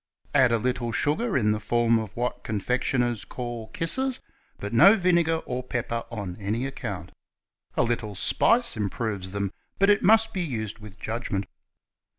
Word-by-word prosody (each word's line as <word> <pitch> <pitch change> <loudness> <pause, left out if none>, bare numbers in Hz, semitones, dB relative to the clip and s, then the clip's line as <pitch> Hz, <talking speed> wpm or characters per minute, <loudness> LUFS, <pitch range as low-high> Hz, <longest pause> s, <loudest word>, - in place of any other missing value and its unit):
Add 130 -4 +5
a 115 - +3
little 120 0 -1
sugar, 155 - +1
in 105 -4 +2
the 105 - 0
form 115 +1 +2
of 110 -1 -7
what 120 +1 -2
confectioners 120 +2 0
call 120 -3 -6
Kisses, 255 - 0 0.4
but 100 +2 -6
no 195 - +8
vine 180 -2 +4
gar 165 0 0
or 125 0 -3
pepper 120 -2 -3
on 100 -6 -5
any 110 +5 -2
account. 100 -10 -5 0.7
A - - +4
little 115 -3 -2
spice 235 - +3
improves 105 -2 -2
them, 100 0 -2 0.3
Ipnt 195 +1 +4
it 205 - +5
must 225 +2 +5
be 190 - -1
used 115 - -4
with 105 -2 -12
judgment. 110 -3 -3
120 Hz, 160 wpm, -26 LUFS, 105-150 Hz, 0.7 s, no